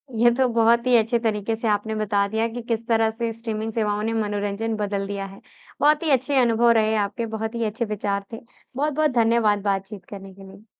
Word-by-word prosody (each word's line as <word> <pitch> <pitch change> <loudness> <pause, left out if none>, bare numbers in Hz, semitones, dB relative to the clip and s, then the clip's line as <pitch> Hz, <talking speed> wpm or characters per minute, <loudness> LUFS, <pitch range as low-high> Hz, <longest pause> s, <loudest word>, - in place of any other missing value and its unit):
ये 240 +2 +5
तो 260 -1 +2
बहुत 235 +1 +3
ही 245 - +5
अच्छे 230 +2 +2
तरीके 220 -1 -1
से 225 0 -3
आपने 215 +1 0
बता 205 -1 0
दिया 220 +2 0
कि 245 - -5
किस 230 0 -1
तरह 225 -1 +3
से 230 0 -3
स्ट्रीमिंग 225 -1 -4
सेवाओं 210 -2 -1
ने 225 +1 -1
मनोरंजन 210 +1 -2
बदल 200 -2 -2
दिया 200 -1 -4
है। 195 0 -12 0.4
बहुत 300 +2 +4
ही 315 - 0
अच्छे 270 +2 +2
अनुभव 235 0 +3
रहे 220 -1 +2
आपके, 210 +2 -1
बहुत 220 +1 -4
ही 230 - -1
अच्छे 225 +3 -2
विचार 200 -1 -3
थे। 225 - -5 0.4
बहुत-बहुत 300 +1 +1
धन्यवाद 225 -3 +2
बातचीत 195 -1 -5
करने 195 -1 -9
के 195 0 -14
लिए। 200 +3 -17
220 Hz, 210 wpm, -23 LUFS, 205-235 Hz, 0.4 s, ये